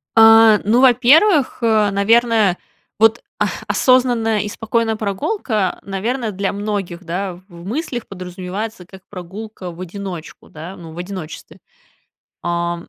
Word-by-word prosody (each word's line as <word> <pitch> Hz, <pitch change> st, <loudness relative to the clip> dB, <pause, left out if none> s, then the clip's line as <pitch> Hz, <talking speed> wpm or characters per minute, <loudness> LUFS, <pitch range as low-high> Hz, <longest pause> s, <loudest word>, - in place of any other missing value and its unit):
А, 225 Hz, -1 st, +7 dB
ну, 230 Hz, +5 st, +3 dB
во-первых, 270 Hz, -, +4 dB
э, 220 Hz, -2 st, +3 dB
наверное, 220 Hz, -1 st, +3 dB, 0.4 s
вот, 225 Hz, +1 st, +4 dB, 0.2 s
а, -, -, +2 dB, 0.2 s
осознанная 245 Hz, -4 st, +2 dB
и 210 Hz, -, -4 dB
спокойная 225 Hz, 0 st, -1 dB
прогулка, 210 Hz, -, -2 dB
э, -, -, -30 dB
наверно, 225 Hz, +4 st, -2 dB
для 195 Hz, 0 st, -2 dB
многих, 200 Hz, -4 st, -4 dB
да, 180 Hz, +2 st, -3 dB
в 180 Hz, +1 st, -15 dB, 0.2 s
в 170 Hz, -, -12 dB
мыслях 245 Hz, -, -4 dB
подразумевается 185 Hz, +2 st, -6 dB
как 190 Hz, +1 st, -14 dB
прогулка 190 Hz, +1 st, -8 dB
в 170 Hz, -, -14 dB
одиночку, 185 Hz, -2 st, -8 dB
да, 165 Hz, +5 st, -9 dB
ну, 165 Hz, -3 st, -11 dB
в 165 Hz, -, -13 dB
одиночестве. 180 Hz, -3 st, -8 dB, 0.8 s
Ам. 170 Hz, 0 st, -3 dB
205 Hz, 135 wpm, -19 LUFS, 180-225 Hz, 0.8 s, А